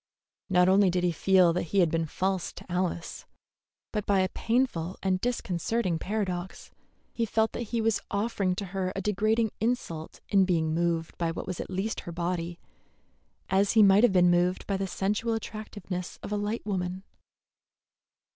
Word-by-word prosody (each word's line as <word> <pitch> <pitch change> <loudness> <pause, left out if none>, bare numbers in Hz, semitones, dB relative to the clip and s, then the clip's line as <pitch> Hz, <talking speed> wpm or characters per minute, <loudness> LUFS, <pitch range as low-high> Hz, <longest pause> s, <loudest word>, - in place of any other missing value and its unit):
Not 180 -1 +4
only 195 0 +5
did 180 0 0
he 175 - +3
feel 180 0 +4
that 180 - 0
he 200 - +2
had 170 -4 +4
been 165 0 0
false 190 +3 -1
to - - -11
Alice, 175 -2 -3 0.7
but 210 -2 -2
by 195 -2 +4
a 185 - +1
painful 225 -9 -1
and 185 -1 +1
disconcerting 195 -5 -1
paradox 190 -2 -3 0.4
he 230 - -1
felt 220 0 +1
that 235 - -5
he 235 -1 0
was 220 -1 +1
offering 200 -3 0
to 200 - -4
her 185 0 -2
a 195 - -2
degrading 215 +2 +1
insult 210 -9 -2
in 195 -2 +5
being 165 -4 +1
moved 165 -1 -1
by 170 -1 +1
what 165 - -5
at - - -5
least 190 +4 -2
was - - -19
her 170 - -5
body, 170 0 -3 0.9
as 195 +1 +3
he 220 -2 +7
might 195 +1 +6
have 245 - +6
been 180 -1 +5
moved 180 +1 +1
by 200 - -1
the 195 0 -2
sensual 210 +5 -1
attractiveness 205 -5 -6
of - - -6
a - - +1
light 205 +2 -2
woman. 185 -2 -2
190 Hz, 175 wpm, -28 LUFS, 175-210 Hz, 0.9 s, he